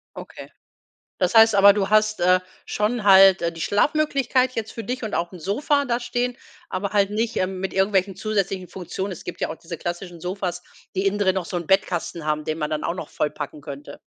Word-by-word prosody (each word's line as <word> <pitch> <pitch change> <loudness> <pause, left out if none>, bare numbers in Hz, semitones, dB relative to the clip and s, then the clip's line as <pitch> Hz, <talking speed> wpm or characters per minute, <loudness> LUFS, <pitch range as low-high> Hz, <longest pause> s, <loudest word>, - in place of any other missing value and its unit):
Okay. - - -10 0.7
Das - - 0
heißt 225 0 +7
aber, 200 0 +8
du 200 -2 -1
hast, 215 -1 +2
äh, 180 +1 +5 0.3
schon 215 +2 -1
halt, 195 -1 +7
äh, 170 0 0
die 165 - -11
Schlafmöglichkeit 260 - +1
jetzt 220 -1 -3
für 225 -3 -7
dich 250 0 -4
und 220 - -4
auch 170 +2 -2
'n 180 - -9
Sofa 285 - 0
da 245 -3 -1
stehen, 245 0 -2 0.3
aber 195 +2 -3
halt 200 -1 +2
nicht, 220 +2 -2
ähm, 185 0 -1
mit 190 0 -4
irgendwelchen 195 0 +1
zusätzlichen 195 -3 -2
Funktionen. 190 +2 -5
Es 180 - -9
gibt 175 - -7
ja - - 0
auch 160 - -6
diese 170 0 -8
klassischen 175 0 -6
Sofas, 180 -1 -3 0.3
die 190 +1 0
innendrin 195 -1 +2
noch 190 - -1
so 180 - -4
'n 170 -2 -5
Bettkasten 175 -4 0
haben, 155 0 -1
den 155 - -2
man 150 -2 -2
dann 155 -1 -2
auch 170 - -2
noch 165 - -7
vollpacken 150 0 -4
könnte. 145 0 -9
190 Hz, 210 wpm, -23 LUFS, 175-215 Hz, 0.7 s, aber